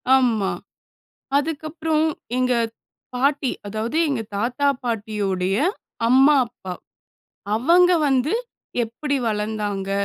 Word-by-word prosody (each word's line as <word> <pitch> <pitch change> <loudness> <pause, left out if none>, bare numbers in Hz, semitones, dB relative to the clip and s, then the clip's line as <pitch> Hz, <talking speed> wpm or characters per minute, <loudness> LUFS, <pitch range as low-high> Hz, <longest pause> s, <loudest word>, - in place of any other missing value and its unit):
ஆமா. 230 -7 +2 0.9
அதுக்கப்புறம் 310 +1 -1 0.3
எங்க 255 0 +2 0.6
பாட்டி 275 0 +1 0.2
அதாவது, 220 +7 -2
எங்க 275 -6 -1
தாத்தா, 245 +7 0 0.2
பாட்டியுடைய 205 -5 -1 0.5
அம்மா, 270 +4 +6
அப்பா. 190 -5 -8 0.8
அவங்க 345 +10 +5 0.2
வந்து 270 +3 +2 0.5
எப்பிடி 280 +6 -3
வளர்ந்தாங்க, 210 -2 -2
245 Hz, 85 wpm, -22 LUFS, 210-285 Hz, 0.9 s, அம்மா